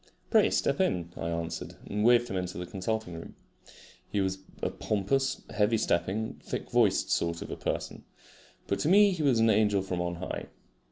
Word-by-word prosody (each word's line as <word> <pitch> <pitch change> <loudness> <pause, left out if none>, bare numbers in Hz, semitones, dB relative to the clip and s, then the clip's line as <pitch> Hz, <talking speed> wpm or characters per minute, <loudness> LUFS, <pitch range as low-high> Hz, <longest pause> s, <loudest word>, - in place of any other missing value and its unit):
"Pray - - +5
step - - +1
in," 85 -1 0
I 85 - -3
answered, 85 0 -4
and 105 +1 -2
waved 120 +1 +5
him 95 - -4
into 90 -1 -3
the 90 - -4
consulting 95 +1 -3
room. 80 0 -9 0.7
He 105 - -1
was 95 0 0 0.2
a - - 0
pompous, 135 +7 -1
heavy 105 +2 +2
stepping, 105 +3 -1
thick - - -5
voiced - - +3
sort 85 0 0
of - - -7
person, - - -3 0.6
but - - -1
to 150 - +1
me 205 +2 +7
he 180 -4 -3
was 135 -5 +3
an 115 0 +5
angel 105 -3 +3
from 90 -2 -2
on 85 0 -2
high. 90 +2 -5
100 Hz, 180 wpm, -29 LUFS, 90-115 Hz, 0.7 s, me